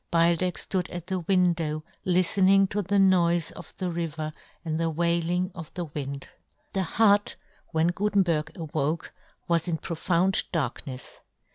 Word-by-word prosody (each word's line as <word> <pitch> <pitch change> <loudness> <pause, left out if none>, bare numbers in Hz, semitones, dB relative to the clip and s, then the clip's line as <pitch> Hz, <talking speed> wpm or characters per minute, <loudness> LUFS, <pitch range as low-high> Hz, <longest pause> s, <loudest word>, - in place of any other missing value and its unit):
Beildech 170 +1 +2
flood 185 -2 -2
at 175 -1 -6
the 185 0 -2
w^indow^ 170 -4 +1 0.2
liftening 190 +2 +4
to 205 - 0
the 200 +2 0
noife 175 -4 +4
of - - -11
the 185 -2 -2
river 160 -2 -3 0.3
and 160 0 -1
the 165 -1 +1
w^ailing 170 +2 +1
of 165 -5 -9
the 175 -2 -3
w^ind. 140 -2 -5 0.5
The 195 - +1
hut 205 +2 +3 0.4
w^hen 165 +1 +2
Gutenberg 185 -6 +1
awoke 155 -1 -2 0.3
was 170 0 +1
in 165 -2 0
profound 175 +4 0
darknefs. 135 -4 -4
170 Hz, 140 wpm, -27 LUFS, 160-185 Hz, 0.5 s, liftening